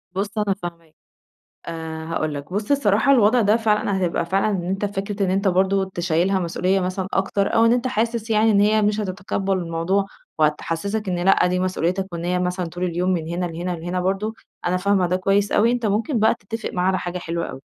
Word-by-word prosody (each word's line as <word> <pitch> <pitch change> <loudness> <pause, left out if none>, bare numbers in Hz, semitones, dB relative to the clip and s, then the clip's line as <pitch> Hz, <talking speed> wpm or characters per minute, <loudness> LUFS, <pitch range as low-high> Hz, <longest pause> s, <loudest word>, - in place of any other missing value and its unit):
بُصّ 200 +3 -3
أنا 210 -2 +1
فاهماك. 170 -2 -8 0.7
آآ، 160 -1 -5
هاقول 155 -2 -2
لك 145 +4 -7
بُصّ 205 +6 -3
الصراحة 275 -1 +3
الوضع 240 -1 +5
ده 210 0 +4
فعلًا 215 -2 +1
حتبقى 180 -3 0
فعلًا 195 +4 +1
إن 190 -4 -2
أنت 195 +3 -2
فكرة 200 0 -3
إن 185 - 0
أنت 195 +1 +1
برضو 190 +1 +2
تشيلها 180 +1 0
مسؤوليّة 185 +2 0
مثلًا 185 +1 -2
أكتر، 195 +1 0
أو 225 - +5
إن 230 - +5
أنت 250 +1 +1
حاسس 230 -2 -1
يعني 220 +1 +4
إن 200 -1 +4
هي 215 +1 +3
مش 210 +1 +1
هتتقبل 195 0 -2
الموضوع، 175 +3 0 0.3
وهتحسسك 165 +7 -1
إن 180 -1 -1
لأ 190 -2 +4
دي 180 0 0
مسؤوليتك، 185 +1 -1
وإن 170 0 -4
هي 180 +1 0
مثلًا 180 0 -1
طول 175 +2 -4
اليوم 180 +1 0
من 165 -3 -1
هنا 175 +1 -2
لهنا 170 +2 -4
لهنا 175 +2 -3
برضو. 195 +4 -1 0.3
أنا 180 +1 +2
فاهمة 190 0 +2
ده 180 - +1
كويّس 195 +2 +1
أوي. 230 +3 +4
أنت 240 -3 -1
ممكن 220 +5 0
بقى 220 - +4
تتفق 225 +1 -6
معاها 180 0 0
على 190 0 +1
حاجة 180 0 -4
حلوة 170 0 -3
أوي. 135 - -9
190 Hz, 210 wpm, -22 LUFS, 175-210 Hz, 0.7 s, الوضع